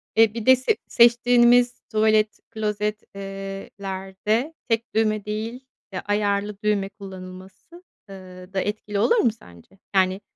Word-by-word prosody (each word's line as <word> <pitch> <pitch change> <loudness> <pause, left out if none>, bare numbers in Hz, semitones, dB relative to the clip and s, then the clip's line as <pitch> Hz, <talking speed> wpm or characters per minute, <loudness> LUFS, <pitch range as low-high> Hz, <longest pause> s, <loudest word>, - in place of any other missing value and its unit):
eee, 225 -1 +5
bir 230 -1 -5
de 260 0 +8
se 260 - 0
seçtiğimiz 240 +1 +5
tuvalet, 215 -1 +2
klozet, 210 0 -2
ııı 195 0 -7
lerde 195 +8 -2 0.2
tek 225 +1 -1
düğme 215 -2 +1
değil, 225 +5 -5 0.3
ya 185 - -4
ayarlı 205 0 0
düğme 205 -2 +1
kullanılması, 190 - -12 0.3
ııı 185 -1 -12
da 190 - 0
etkili 210 0 -3
olur 465 - +3
mu 240 - +3
sence? 140 - -18 0.2
Yani, 190 +1 +2
210 Hz, 135 wpm, -23 LUFS, 195-225 Hz, 0.3 s, de